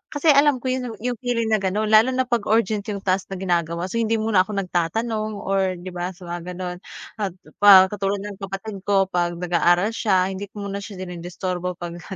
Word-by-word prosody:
kasi 300 +2 +4
alam 280 -3 +4
ko 255 - 0
'yon, 250 -3 -3
yung 245 -2 -2
feeling 230 -3 -1
na 215 - +3
gano'n, 210 +3 -1
lalo 220 +3 +7
na 260 - +2
'pag 240 -4 -1
urgent 215 -2 +1
yung 200 -2 -4
task 185 0 0
na 195 - -6
ginagawa. 170 -2 -1
So, 230 - -1
hindi 225 0 +1
muna 215 -4 +2
ako 210 - -5
nagtatanong 215 +4 -1
or, 190 -1 0
'di 180 +1 -8
ba, 180 +1 -4
sa 180 - -15
mga 175 +1 -6
gano'n, 180 -1 -5 0.4
at, 195 -4 -2 0.2
pa 190 -2 +8
katulad 200 -1 -2
ng 205 -1 -8
kapatid 195 +1 -6
ko, 195 -1 +2
'pag 175 -1 0
nag-aaral 175 +3 +2
siya, 195 -4 +1
hindi 195 +1 -6
ko 205 +1 -8
muna 200 0 -4
siya 200 0 -9
dinidisturbo 180 0 -4
pagka 175 +2 -7
195 Hz, 205 wpm, -22 LUFS, 180-220 Hz, 0.4 s, pa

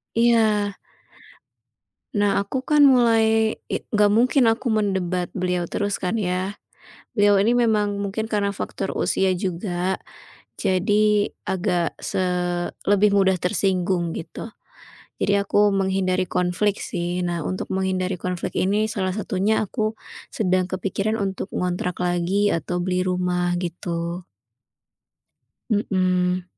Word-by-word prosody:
Iya. 220 -4 +3 1.4
Nah, 205 -1 +2
aku 260 +6 -4
kan 300 -1 +4
mulai 225 -4 +4 0.2
it - - -3
nggak 210 -1 +4
mungkin 245 +2 +4
aku 230 +4 -3
mendebat 190 -5 0
beliau 180 -1 -1
terus 205 0 -1
kan 185 +5 0
ya. 185 +1 -2 0.6
Beliau 205 -1 +4
ini 230 +4 +3
memang 210 -4 +2
mungkin 200 +2 -3
karena 205 -2 0
faktor 195 0 -4
usia 190 -1 +1
juga, 180 0 -2 0.6
jadi 205 +2 +2 0.2
agak 175 -2 -1
se 185 - -2 0.6
lebih 205 +1 +4
mudah 190 -1 +4
tersinggung 180 -2 0
gitu. 165 - -7 0.8
Jadi 200 - +2
aku 205 +1 +3
menghindari 190 -1 0
konflik 180 +3 0
sih. 175 +1 -3
Nah, 170 -2 -2
untuk 185 - -4
menghindari 190 -1 -1
konflik 180 0 -3
ini, 210 +3 +1
salah 190 -2 -2
satunya 210 +1 0
aku 215 +1 -2 0.3
sedang 185 -3 0
kepikiran 195 +3 -2
untuk 195 -3 -3
ngontrak 180 0 -1
lagi 180 +4 +1
atau 175 +1 -2
beli 185 0 0
rumah 180 -1 0
gitu. 170 0 -4 1.5
Mhm. 185 -3 +1
190 Hz, 115 wpm, -23 LUFS, 180-210 Hz, 1.5 s, kan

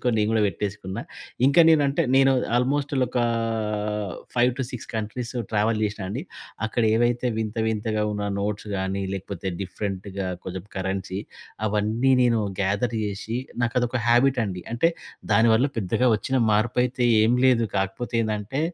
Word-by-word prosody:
గుంజేసుకొని 125 -2 +1
నేను 105 0 +2
గూడా 110 -1 +2
వెట్టేసుకున్నా. 100 -1 -4 0.5
ఇంకా 140 +5 +5
నేనంటే 150 0 +4
నేను 135 0 +5 0.2
ఆల్మోస్ట్ 140 +3 0
ల్ 130 - +4
ఒకా 125 0 0 1.1
5-6 125 0 0
కంట్రీస్ 110 +2 -4 0.2
ట్రావెల్ 110 0 +1
జేశ్నా 105 -2 -2
అండి. 120 +8 -4 0.4
అక్కడ 110 +2 0
ఏవైతే 120 +2 +1
వింత 110 0 -3
వింతగా 110 0 -1
ఉన్న 105 0 -2
నోట్స్ 105 +1 -3
గాని 95 +1 -2
లేకపోతే 95 -1 -6
డిఫరెంట్‌గా 100 0 -4 0.2
కొంచెం 95 0 -6
కరెన్సీ, 95 0 -3 0.5
అవన్నీ 110 +5 +1
నేను 120 -2 +3 0.2
గేథర్ 100 +5 0
జేషి 105 +3 -3 0.2
నాకు 120 -1 0
అదొక 120 +1 -1
హాబిట్ 125 +2 +4
అండి. 90 -2 -5
అంటే 145 +8 +3 0.4
దాని 115 +3 +5
వల్ల 125 +5 +3
పెద్దగా 115 +5 +1
ఒచ్చిన 130 +5 -2 0.2
మార్పైతే 125 +4 +1 0.2
ఏం 115 - +4
లేదు 120 -3 +4
కాకపోతే 95 +6 -3
ఏందంటే 110 +5 -2
110 Hz, 140 wpm, -24 LUFS, 100-125 Hz, 1.1 s, ఇంకా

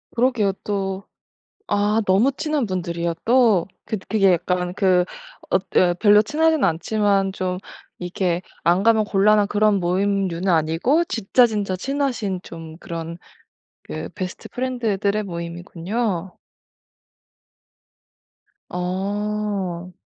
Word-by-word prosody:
그러게요. 235 -5 +2
또. 195 -1 -2 0.7
아 210 +2 +2
너무 210 +9 +4
친한 300 -3 -1
분들이요 170 -3 -2
또. 230 -7 +4 0.2
그 220 - -3
그게 195 -2 +4
약간 180 +1 0
그 185 -3 +3 0.5
엇 190 - +2
어 175 -1 +4
별로 205 +3 +5
친하진 315 +5 +2
않지만 195 +2 +1
좀 185 -1 -2 0.4
이렇게 180 0 -1 0.2
안 175 +3 +3
가면 220 0 +4
곤란한 205 +1 +3
그런 210 -1 +2
모임류는 190 0 0
아니고 165 - +2
진짜 245 - +3
진짜 205 -4 -2
친하신 235 -4 -2
좀 165 -1 -10
그런 165 -1 -6 0.7
그 - - -6
베스트 185 -2 -6
프렌드들의 215 -5 -1
모임이군요. 175 +2 -4 2.3
어. 190 0 -3
195 Hz, 225 characters per minute, -22 LUFS, 180-215 Hz, 2.3 s, 별로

